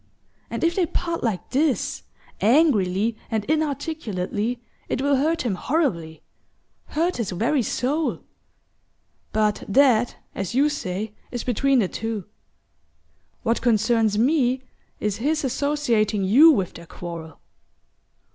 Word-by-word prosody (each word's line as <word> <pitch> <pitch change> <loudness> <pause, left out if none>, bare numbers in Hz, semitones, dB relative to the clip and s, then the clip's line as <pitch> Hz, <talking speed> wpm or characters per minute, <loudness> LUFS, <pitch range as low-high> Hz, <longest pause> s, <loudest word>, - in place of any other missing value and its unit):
And - - -4
if 335 +1 +3
they 355 -2 +1
part 335 +1 -2
like 220 -6 -2
this, 280 +1 0 0.4
angrily 220 - +3
and 220 -3 -1
inarticulately, 260 - -2 0.3
it - - -1
will 280 +1 +2
hurt 320 +5 +1
him 235 -5 0
horribly 180 - -1 0.6
hurt 340 +4 -1
his 230 -5 -2
very 240 +10 +1
soul. 285 +7 -1 1.1
But 215 -1 +1
that, 240 0 +4 0.2
as 195 +4 -4
you 285 +3 +4
say, 210 -6 -4 0.2
is 245 - -4
between 270 +3 +2
the 215 -6 +3
two. 220 -1 -4 1.2
What 230 +1 +1
concerns 225 -2 +2
me 260 0 +2 0.4
is 210 -2 -1
his 300 +6 0
associating 240 -7 +1
you 255 +13 +7
with 195 - +2
their 170 0 -11
quarrel. 165 -3 -8
240 Hz, 120 wpm, -23 LUFS, 205-290 Hz, 1.2 s, you